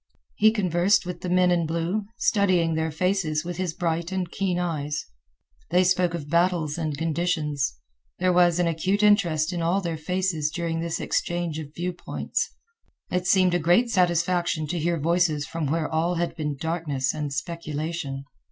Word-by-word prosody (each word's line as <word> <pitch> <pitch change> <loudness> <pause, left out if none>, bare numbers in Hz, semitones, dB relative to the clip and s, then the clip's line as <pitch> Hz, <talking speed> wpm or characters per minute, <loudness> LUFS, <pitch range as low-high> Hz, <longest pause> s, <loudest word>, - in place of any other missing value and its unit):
He 215 - +5
conversed 190 -3 +2
with 180 -1 -6
the 180 - -3
men 180 0 +4
in 170 -2 +1
blue, 170 +6 -1
studying 185 -8 +2
their 160 0 0
faces 165 -1 0
with 175 -1 -5
his 180 -3 -2
bright 170 -1 -1
and 185 -2 -2
keen 185 -3 -1
eyes. 150 -4 -2 0.6
They 180 +2 +4
spoke 180 -1 +2
of 150 -4 -6
battles 170 -2 +1
and 155 -4 -3
conditions. 155 - -1 0.4
There 180 0 +2
was 175 -1 +4
an 175 - +2
acute 185 +5 0
interest 180 -6 +3
in 175 - -2
all 170 +4 +2
their 170 -4 -3
faces 165 -1 -1
during 165 0 -2
this 165 0 -2
exchange 175 -2 -1
of 150 -1 -9
view 180 +1 -2
points. 175 - -3 0.6
It 180 0 0
seemed 185 -2 +4
a 175 - +2
great 175 +9 +3
satisfaction 175 -3 +1
to 175 - -1
hear 170 +1 0
voices 165 -1 +1
from 165 -2 -3
where 160 +2 0
all 165 +3 0
had 175 0 -1
been 150 -3 -3
darkness 150 -4 -1
and 150 -2 -3
speculation. 155 -1 -4
170 Hz, 170 wpm, -25 LUFS, 155-180 Hz, 0.6 s, He